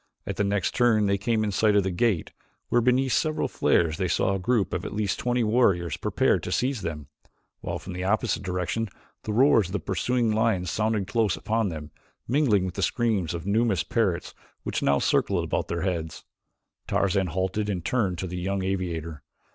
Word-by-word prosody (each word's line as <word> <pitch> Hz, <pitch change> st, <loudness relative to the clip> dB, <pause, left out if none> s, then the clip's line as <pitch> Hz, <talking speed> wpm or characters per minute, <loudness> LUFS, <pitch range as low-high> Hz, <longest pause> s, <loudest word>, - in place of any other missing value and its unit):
At -, -, -4 dB
the -, -, +2 dB
next 100 Hz, -2 st, 0 dB
turn 115 Hz, -4 st, +3 dB
they 100 Hz, -1 st, +1 dB
came 110 Hz, +1 st, +1 dB
in 105 Hz, -, -1 dB
sight 105 Hz, +2 st, +2 dB
of 100 Hz, -, +4 dB
the 95 Hz, -, -1 dB
gate, 95 Hz, -1 st, 0 dB, 0.4 s
where, 120 Hz, -, +3 dB
beneath 125 Hz, +1 st, +2 dB
several 155 Hz, +4 st, +1 dB
flares, 80 Hz, 0 st, +1 dB
they 95 Hz, -, +1 dB
saw 95 Hz, +2 st, +1 dB
a 95 Hz, -, -1 dB
group 105 Hz, +1 st, 0 dB
of -, -, -2 dB
at -, -, -5 dB
least 105 Hz, -2 st, -1 dB
twenty 125 Hz, -1 st, +1 dB
warriors 100 Hz, -, +2 dB
prepared -, -, +1 dB
to -, -, -5 dB
seize 130 Hz, -3 st, 0 dB
them, 75 Hz, -4 st, -5 dB, 0.5 s
while -, -, -4 dB
from 90 Hz, -, -8 dB
the 90 Hz, +1 st, -4 dB
opposite 105 Hz, +1 st, 0 dB
direction 95 Hz, +4 st, -2 dB, 0.4 s
the 110 Hz, -, -2 dB
roars 115 Hz, -3 st, +4 dB
of 90 Hz, -, -9 dB
the 105 Hz, -, 0 dB
pursuing 115 Hz, +5 st, 0 dB
lions 105 Hz, -6 st, +1 dB
sounded 110 Hz, -2 st, 0 dB
close 110 Hz, -1 st, 0 dB
upon 110 Hz, -1 st, 0 dB
them, 75 Hz, -2 st, -7 dB, 0.4 s
mingling 120 Hz, -8 st, +2 dB
with 90 Hz, -, -4 dB
the 100 Hz, -, -4 dB
screams 100 Hz, -4 st, 0 dB
of 85 Hz, -, -6 dB
numerous 100 Hz, -3 st, +1 dB
parrots 100 Hz, -7 st, -1 dB, 0.3 s
which -, -, -2 dB
now 70 Hz, -, +3 dB
circled -, -, +1 dB
about -, -, -2 dB
their 85 Hz, 0 st, -3 dB
heads. 85 Hz, -4 st, -3 dB, 0.6 s
Tarzan 95 Hz, -1 st, +1 dB
halted 95 Hz, +5 st, -1 dB
and 90 Hz, -4 st, -3 dB
turned 100 Hz, -8 st, 0 dB
to 95 Hz, -, -3 dB
the 90 Hz, 0 st, -5 dB
young 95 Hz, +1 st, -2 dB
aviator. 85 Hz, -5 st, -3 dB
100 Hz, 195 wpm, -26 LUFS, 90-115 Hz, 0.6 s, of